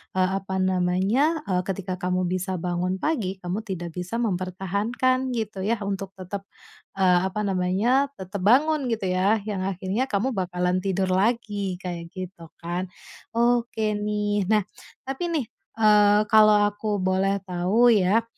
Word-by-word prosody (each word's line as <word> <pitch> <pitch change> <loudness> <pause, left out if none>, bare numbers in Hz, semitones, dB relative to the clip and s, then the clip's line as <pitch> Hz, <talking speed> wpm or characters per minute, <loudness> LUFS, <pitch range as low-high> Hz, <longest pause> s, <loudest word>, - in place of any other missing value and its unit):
eee, 185 0 +2
apa 190 0 -5
namanya, 190 - +1
eee, 180 -2 0
ketika 185 -1 -3
kamu 180 0 0
bisa 185 +1 -2
bangun 180 +2 -1
pagi, 225 - 0
kamu 185 +4 -4
tidak 175 -3 -5
bisa 180 +5 -5
mempertahankan 210 +6 -1
gitu 215 -3 -4
ya 220 +4 0
untuk 195 -1 -3
tetap, 195 +2 -7 0.5
eee, 180 -2 +4
apa 210 +2 -3
namanya 200 +9 +1
tetap 190 +1 -6
bangun 275 +6 +3
gitu 220 -4 -2
ya, 195 +4 +3
yang 200 -3 -3
akhirnya 195 +7 -2
kamu 200 +2 0
bakalan 180 -2 -1
tidur 190 0 -1
lagi, 205 -1 0
kayak 175 -2 -5
gitu 185 -3 -8
kan. 175 +2 -4 0.5
Oke 235 -2 +1
nih, 205 -2 -1
nah 215 -1 +3 0.4
tapi 270 +6 -3
nih, 320 -6 0 0.3
eee, 210 -1 +5
kalau 215 -1 +7 0.2
aku 205 +1 -5
boleh 195 +1 +1
tahu 190 +7 +3
ya, 210 +2 +3
195 Hz, 145 wpm, -25 LUFS, 185-220 Hz, 0.5 s, kalau